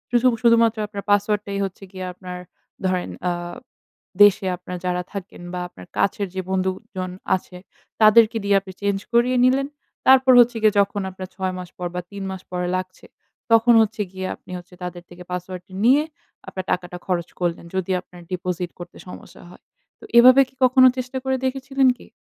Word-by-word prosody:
উসু 240 +1 +4 0.2
শুধুমাত্র 230 -1 +4
আপনার 200 -1 -7
পাসওয়ার্ডটাই 205 -1 +1
হচ্ছে 195 +1 -9
গিয়ে 185 -1 -6
আপনার 180 0 -8 0.5
ধরেন 185 -1 0 0.2
আ - - +1 0.9
দেশে 205 -1 +5
আপনার 180 0 -7
যারা 180 0 0
থাকেন 195 -3 -8
বা, 180 - -3
আপনার 90 - -14
কাছের 200 0 0
যে 190 - -1
বন্ধুজন 185 0 -3 0.2
আছে 180 0 -8 0.4
তাদেরকে 220 +1 +6
দিয়ে 200 0 +3
আপনি 195 -1 -11
চেঞ্জ 200 -1 0
করিয়ে 245 +2 +3
নিলেন। 270 +2 +2 0.4
তারপর 260 0 +7
হচ্ছে 240 0 +5
গিয়ে 215 -1 +4
যখন 200 0 +1
আপনার 185 0 -8
৬ 190 -1 -2
মাস 180 -1 -7
পর 180 -1 -3
বা, 180 - -2
৩ 200 -1 -6
মাস 190 -1 -7
পরে 180 0 -2
লাগছে, 185 0 -8 0.5
তখন 230 +1 +6
হচ্ছে 215 0 -1
গিয়ে 190 0 -5
আপনি - - -16
হচ্ছে 180 +1 -13
তাদের 175 -1 -6
থেকে 175 0 -12
পাসওয়ার্ডটা 180 +1 -6
নিয়ে 275 +5 +5 0.4
আপনার 185 -1 -6
টাকাটা 180 0 -2
খরচ 175 -2 -1
করলেন। 175 -1 -2
যদি 190 0 -1
আপনার 180 -1 -15
ডিপোজিট 180 -1 -3
করতে 175 0 -10
সমস্যা 180 - -12
হয়। - - -16 0.4
তো - - -18
এভাবে 255 +3 +8
কি - - -29
কখনো 255 0 +7
চেষ্টা 255 +1 -4
করে 265 0 0
দেখেছিলেন 270 0 +1
কি? - - -16
195 Hz, 175 wpm, -22 LUFS, 180-230 Hz, 0.9 s, এভাবে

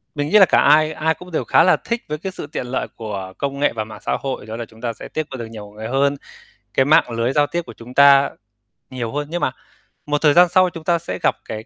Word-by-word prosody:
mình 145 0 -2
nghĩ 215 - +5
là 190 - +9
cả - - +3
ai 155 +1 +4
ai 160 +1 0
cũng 180 +2 -13
đều 160 - -1
khá - - +4
là 180 - +4
thích 235 0 -3
với 150 - -2
cái 190 +4 -5
sự 170 - -8
tiện 145 - -5
lợi 130 - -2
của 100 -4 -6
công 140 0 -3
nghệ 145 - +2
và 110 - -2
mạng 110 0 -11
xã - - 0
hội. 135 -5 -5
Đó 110 +1 -7
là 115 0 -5
chúng 110 0 -19
ta 120 -2 -2
sẽ - - -10
tiếp 155 - -3
qua 130 - -5
được 120 - -5
nhiều 105 -2 -10
người 110 +1 -7
hơn. 140 +3 +1 0.6
Cái 135 - +3
mạng 150 -3 +4
lưới 115 +2 -1
giao 145 0 +3
tiếp 175 +3 -2
của 115 - -10
chúng 115 +3 -12
ta 140 0 +6 0.6
nhiều 120 -3 -4
hơn, 145 0 -3
nhưng 175 0 -2
mà - - +1 0.5
một 150 0 -1
thời 150 -2 +5
gian 175 +1 +6
sau 185 0 +4
chúng 165 -2 -10
ta 170 0 +1
sẽ 170 - -6
gặp - - +3
cái 110 0 -7
140 Hz, 285 wpm, -20 LUFS, 115-155 Hz, 0.6 s, là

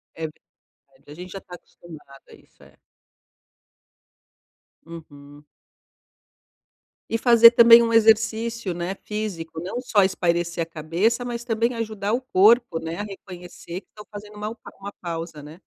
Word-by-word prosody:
É, 160 - -4
ver 155 - -13 0.7
A 145 - -11
gente, 180 +3 -10
já, 195 - -8
tá 180 -2 -12
acostumado 155 -5 -16
a - - -16
isso, - - -24
é. - - -20 2.1
Uhum. 145 -3 -13 1.7
E 225 - +1
fazer, 235 -1 +7
também, 235 0 +8
um 230 0 -1
exercício, 225 -1 +2
né, 175 +2 -4
físico, 180 -7 -5
não 190 +8 -5
só 215 -6 +2
espairecer 170 -2 -1
a - - -4
cabeça, 170 +10 -1
mas, 240 -1 -5
também, 235 +1 -1
ajudar 215 -2 -4
o 240 - 0
corpo, 235 -5 +3
né, 165 +1 -6
a - - -3
reconhecer 180 -3 -10
que - - -39
tá 210 - -13
fazendo 210 0 -10
uma 210 +1 -5 0.3
uma 200 +1 -8
pausa, 165 -3 -6
né. 155 +5 -13
195 Hz, 145 wpm, -23 LUFS, 170-225 Hz, 2.1 s, também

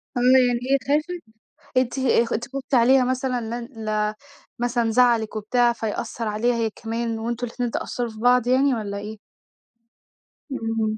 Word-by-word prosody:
آه - - 0
يعني 250 -1 +4
هي 275 - +5
خافِت؟ 310 +5 0 0.5
أنتِ 255 +1 +1 0.3
خ - - -3
أنتِ 235 +2 -2
خُفتِ 275 +1 -7
عليها 255 +1 +5
مثلًا 255 0 -1
لان 235 0 -5 0.2
لا 215 0 0 0.4
مثلًا 240 -1 0
زعلِك 235 -2 +3
وبتاع 235 +3 +2
فيأثر 225 0 -4
عليها 225 +3 +1
هي 230 -1 0
كمان 230 +1 -4
وأنتم 235 +2 -3
الاتنين 240 0 -3
تأثروا 240 -1 -3
في 220 - -11
بعض 245 +1 +3
يعني 265 +2 +3
والّا 205 -3 -3
إيه؟ 210 +2 -7 1.3
إمم. 225 -3 -1
240 Hz, 155 wpm, -23 LUFS, 225-250 Hz, 1.3 s, هي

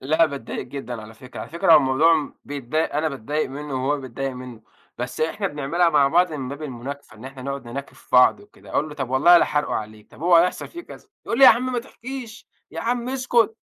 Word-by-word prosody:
لأ، 155 +5 +3
باتضايق 140 -6 -6
جدًا 125 -5 -6
على 110 +1 -12
فكرة. 125 +3 -10
على - - -7
فكرة 170 - +3
هو - - +10
الموضوع 140 +5 +4
م 155 -2 -3
بيتضايق 145 +2 -2
أنا 155 +1 +1
باتضايق 145 +2 -3
منه، 135 -2 -4
وهو 145 0 0
بيتضايق 135 +1 -4
منه. 125 -3 -10 0.4
بس 125 +1 -5
إحنا 195 +6 -1
بنعملها 150 +3 +1
مع 145 -3 +4
بعض 175 +3 +3
من 135 -4 -4
باب 140 +3 -7
المناكفة، 135 -2 -7
إن 110 - -13
إحنا 135 0 -9
نقعد 140 0 -5
نناكف 135 +4 -8
في - - -27
بعض 125 +10 +6
وكده. 205 0 -17
أقول 155 - 0
له: 150 - -9
"طب 135 -4 -4
والله 170 +7 +6
لحارقه 150 -3 0
عليك، 110 -1 -6
طب - - -14
هو 175 0 +5
هيحصل 175 +2 +2
في 345 0 -9
كذا." 420 - -14 0.2
يقُل 230 - -1
لي: 270 - +8
"يا - - +12
عم 255 +2 +1
ما 245 - 0
تحكيش، 245 -1 -9 0.2
يا - - -6
عم 240 +1 -1
اسكت، 240 -4 +1
145 Hz, 230 wpm, -23 LUFS, 130-175 Hz, 0.4 s, يا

